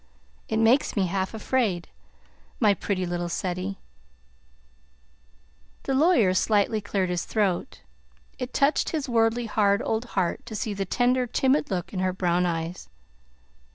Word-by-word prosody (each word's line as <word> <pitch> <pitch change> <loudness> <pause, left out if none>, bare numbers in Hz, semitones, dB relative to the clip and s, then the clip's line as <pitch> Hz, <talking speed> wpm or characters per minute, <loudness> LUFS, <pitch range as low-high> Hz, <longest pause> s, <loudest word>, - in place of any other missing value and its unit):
It 220 - 0
makes 225 +5 +3
me 200 -3 +2
half 190 +3 -2
afraid. 215 -6 0 0.7
My 210 -4 +5
pretty 190 -2 -2
little 175 0 -3
Ceddie!" 185 +2 -3 2.1
The 270 - -1
lawyer 265 - +4
slightly 210 +3 +2
cleared 195 -2 -1
his 175 -1 -1
throat. 200 -5 -1 0.6
It 250 0 -4
touched 280 +2 +2
his 305 -4 -2
worldly, 230 0 +2
hard 205 -2 +2
old 225 +2 -1
heart 180 -3 0
to 220 - -6
see 210 0 -2
the 195 -1 -3
tender, 250 +5 +1
timid 265 +4 +1
look 180 0 -3
in 185 - -3
her 185 0 0
brown 180 -1 +1
eyes. 165 +1 -4
205 Hz, 140 wpm, -26 LUFS, 185-235 Hz, 2.1 s, My